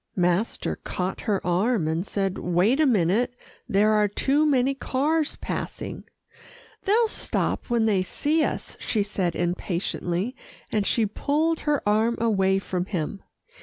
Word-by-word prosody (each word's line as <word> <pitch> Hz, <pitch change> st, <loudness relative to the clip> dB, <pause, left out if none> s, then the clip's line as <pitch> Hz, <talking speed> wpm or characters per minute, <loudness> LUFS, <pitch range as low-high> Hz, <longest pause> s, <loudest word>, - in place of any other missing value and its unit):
Master 180 Hz, +4 st, 0 dB
caught 185 Hz, +1 st, -4 dB
her 205 Hz, -3 st, -1 dB
arm, 185 Hz, +1 st, +1 dB
and 165 Hz, +4 st, -1 dB
said, 195 Hz, -2 st, -1 dB
"Wait 180 Hz, -, +2 dB
a 310 Hz, -, +5 dB
minute 220 Hz, +3 st, +2 dB, 0.3 s
there 210 Hz, +2 st, +4 dB
are 210 Hz, -1 st, +4 dB
too 280 Hz, +9 st, +2 dB
many 270 Hz, -1 st, +3 dB
cars 295 Hz, +4 st, 0 dB
passing." -, -, -5 dB, 0.8 s
"They'll 445 Hz, +4 st, +4 dB
stop 435 Hz, -, -2 dB
when 235 Hz, -2 st, +2 dB
they 205 Hz, -4 st, +3 dB
see 300 Hz, +11 st, 0 dB
us," -, -, -3 dB
she 215 Hz, -3 st, 0 dB
said 190 Hz, -4 st, -2 dB
impatiently, 175 Hz, +4 st, -2 dB, 0.4 s
and 210 Hz, -2 st, +1 dB
she 230 Hz, -, +3 dB
pulled 305 Hz, +9 st, 0 dB
her 295 Hz, -6 st, 0 dB
arm 220 Hz, +3 st, +2 dB
away 195 Hz, -4 st, +2 dB
from 185 Hz, -2 st, -2 dB
him. 190 Hz, 0 st, -3 dB
210 Hz, 140 wpm, -25 LUFS, 185-265 Hz, 0.8 s, a